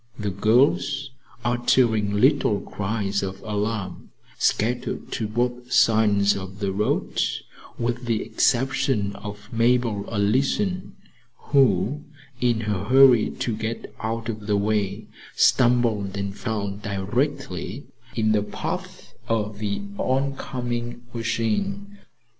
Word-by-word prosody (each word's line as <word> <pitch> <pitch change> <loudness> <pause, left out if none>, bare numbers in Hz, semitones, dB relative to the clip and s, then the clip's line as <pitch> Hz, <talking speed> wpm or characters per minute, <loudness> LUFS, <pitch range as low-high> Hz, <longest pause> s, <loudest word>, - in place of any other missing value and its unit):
The 105 -2 -2
girls, 130 +6 +2 0.3
uttering 120 -3 +2
little - - +3
cries 100 -1 -2
of 95 0 -4
alarm, 105 -3 -3 0.3
scattered 120 +3 0
to 110 - -2
both 120 +2 -2
sides 105 -4 +4
of 95 0 -7
the 100 -2 -1
road, 105 +2 0 0.6
with 120 +1 -2
the 115 -2 0
exception 120 -5 +1
of 105 +2 -9
Mabel 115 -3 +1
Allison, 135 - 0 0.6
who, 135 0 +3 0.4
in 120 -3 +2
her 105 -3 -2
hurry 130 -1 +6
to 115 - -3
get 110 +1 -5
out 115 +1 -3
of 110 -2 -5
the 105 -1 +2
way, 105 0 0 0.3
stumbled 120 -6 +3
and 100 0 -3
fell 105 -2 -2
directly 100 - -3 0.3
in 110 -2 +2
the 105 -1 +3
path 105 - -5 0.2
of 105 -2 -1
the 105 - -2 0.2
oncoming 125 -3 -2
machine. 195 - -2
110 Hz, 110 wpm, -24 LUFS, 105-125 Hz, 0.6 s, hurry